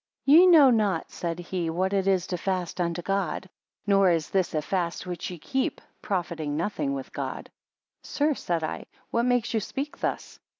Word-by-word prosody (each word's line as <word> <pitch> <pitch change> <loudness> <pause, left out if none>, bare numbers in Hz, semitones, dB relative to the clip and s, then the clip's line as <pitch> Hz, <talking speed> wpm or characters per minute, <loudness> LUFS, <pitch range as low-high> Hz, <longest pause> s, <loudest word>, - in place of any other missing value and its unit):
Ye 325 +6 +8
know 305 -7 +8
not, 205 -7 +1
said 170 -1 -3
he, 175 -1 -3
what 185 +4 -1
it 195 -1 +1
is 190 -2 +2
to 180 - -3
fast 185 -2 -2
unto 170 0 -2
God; 195 -2 -1 0.4
nor 195 -2 +4
is 165 -3 0
this 190 -4 0
a 155 - +1
fast 175 -1 -2
which 180 -2 -5
ye 180 - -7
keep, 265 - -2 0.2
profiting 165 -6 -2
nothing 155 -6 -1
with 135 - -7
God. - - -5 0.5
3 - - -15
Sir, 300 +1 +1
said 170 - -2
I, 155 - -4 0.3
what 235 +1 +1
makes 245 -2 +1
you 225 - +2
speak 275 +7 -5
thus? - - -3
185 Hz, 185 wpm, -26 LUFS, 170-215 Hz, 0.5 s, Ye